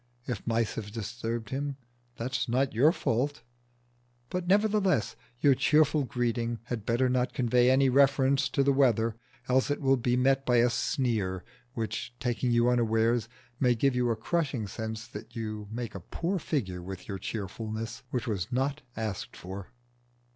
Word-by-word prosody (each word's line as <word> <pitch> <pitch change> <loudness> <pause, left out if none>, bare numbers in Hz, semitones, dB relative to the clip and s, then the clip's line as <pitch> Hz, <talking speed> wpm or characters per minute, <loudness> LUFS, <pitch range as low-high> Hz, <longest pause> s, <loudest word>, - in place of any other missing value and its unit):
If 120 -4 -4
mice 115 -1 +1
have 105 -2 -6
disturbed 115 0 -4
him, 140 +1 -2 0.4
that 125 +3 -4
is 130 -1 -1
not 130 +3 +1
your 135 +8 +5
fault; 140 -4 -1 0.9
but, 180 -1 -2
nevertheless, 200 - +2 0.3
your 140 -2 +6
cheerful 150 +2 +3
greeting 120 -1 -1
had 120 -3 -5
better 120 +2 +3
not 125 0 +1
convey 125 0 +3
any 135 +1 +5
reference 135 0 +4
to 140 - +2
the 140 0 +3
weather, 115 -5 +3 0.3
else 130 +2 +2
it 145 - 0
will 135 -2 +3
be 125 0 +1
met 135 +1 +3
by 125 -2 +2
a 120 +1 +4
sneer 115 - -1 0.3
which, 115 +1 -4
taking 125 0 -1
you 120 0 +3
unawares, 115 -1 +2 0.3
may 125 -2 +4
give 135 +3 +2
you 125 -1 +2
a 115 - +2
crushing 135 -1 -1
sense 110 +2 -5
that 115 +2 -10
you 110 -2 -4
make 115 +1 -5
a 95 - -6
poor 175 - -2
figure 100 - -2
with 95 +1 -8
your 100 -1 -4
cheerfulness, 110 +3 -5
which 125 -2 -2
was 105 -3 -2
not 135 +4 0 0.2
asked 110 -3 -4
for. 95 +1 -7
120 Hz, 165 wpm, -29 LUFS, 110-135 Hz, 0.9 s, your